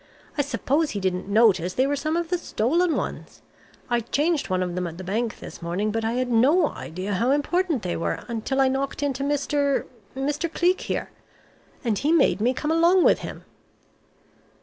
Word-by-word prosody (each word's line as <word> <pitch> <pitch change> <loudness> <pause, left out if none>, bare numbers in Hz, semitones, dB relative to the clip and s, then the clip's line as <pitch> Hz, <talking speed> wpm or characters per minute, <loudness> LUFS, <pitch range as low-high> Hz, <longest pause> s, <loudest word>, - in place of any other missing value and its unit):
I 290 - +2
suppose 285 +3 0
he 205 - -3
didn't 185 -1 -2
notice 200 -4 +3
they 260 - +3
were 285 +1 0
some 310 +3 -1
of 340 -1 -2
the 360 -1 0
stolen 330 +5 +1
ones. - - -5 0.4
I 240 -1 +1
changed 295 +7 0
one 185 0 +1
of 180 -1 -3
them 180 0 -2
at 165 0 -8
the 185 - -7
bank 220 +5 -2
this - - -10
morning, 180 +6 -1
but 225 +1 -2
I 225 +1 0
had 250 0 -1
no 285 +8 +4
idea 185 +5 -5
how 230 +6 +1
important 295 - +1
they 175 -1 -2
were 165 - -2
until 235 +4 -2
I 265 - +5
knocked 270 +2 -2
into 275 -1 -1
Mr. 285 0 0 0.3
Mr. 295 +5 -2
Cleek 360 +2 +2
here. - - -3 0.7
And 225 -5 0
he 295 - +1
made 275 - +3
me 240 +3 +3
come 300 +4 -2
along 340 +3 +4
with - - +4
him." - - -8
265 Hz, 195 wpm, -24 LUFS, 210-300 Hz, 0.7 s, I